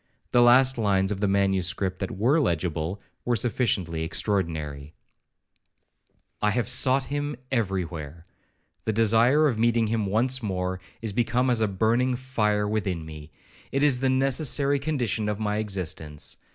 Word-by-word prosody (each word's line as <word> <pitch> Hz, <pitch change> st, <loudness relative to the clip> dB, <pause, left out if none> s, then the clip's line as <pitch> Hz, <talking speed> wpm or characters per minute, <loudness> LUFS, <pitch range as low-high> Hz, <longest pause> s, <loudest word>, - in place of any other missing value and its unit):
The 120 Hz, -, +4 dB
last 125 Hz, +1 st, +5 dB
lines 100 Hz, -2 st, +1 dB
of 100 Hz, -, -3 dB
the 100 Hz, -, +1 dB
manuscript 95 Hz, -1 st, 0 dB
that 95 Hz, -1 st, -4 dB
were 130 Hz, +10 st, +3 dB
legible, 85 Hz, -, -1 dB, 0.2 s
were 120 Hz, -, +1 dB
sufficiently 100 Hz, -8 st, 0 dB
extraordinary. 80 Hz, -6 st, -2 dB, 1.5 s
'I 105 Hz, -, +3 dB
have 115 Hz, +3 st, 0 dB
sought 135 Hz, 0 st, +2 dB
him 145 Hz, 0 st, -2 dB, 0.2 s
every 95 Hz, -7 st, 0 dB
where.—The 85 Hz, +6 st, -9 dB
desire 115 Hz, +7 st, +4 dB
of 120 Hz, -7 st, 0 dB
meeting 115 Hz, 0 st, +2 dB
him 110 Hz, -1 st, -1 dB
once 125 Hz, +6 st, +2 dB
more, 95 Hz, -3 st, -3 dB, 0.2 s
is 110 Hz, -3 st, -2 dB
become 120 Hz, +3 st, +1 dB
as 115 Hz, -2 st, +1 dB
a 110 Hz, -, +3 dB
burning 115 Hz, +6 st, +1 dB
fire 105 Hz, -5 st, 0 dB
within 95 Hz, -6 st, -2 dB
me,—it 80 Hz, -, -7 dB
is 140 Hz, -4 st, +3 dB
the 130 Hz, 0 st, +1 dB
necessary 135 Hz, +1 st, +1 dB
condition 125 Hz, -8 st, -1 dB
of 105 Hz, -, -2 dB
my 105 Hz, -1 st, -1 dB
existence. 90 Hz, -8 st, -4 dB
105 Hz, 140 wpm, -25 LUFS, 95-125 Hz, 1.5 s, last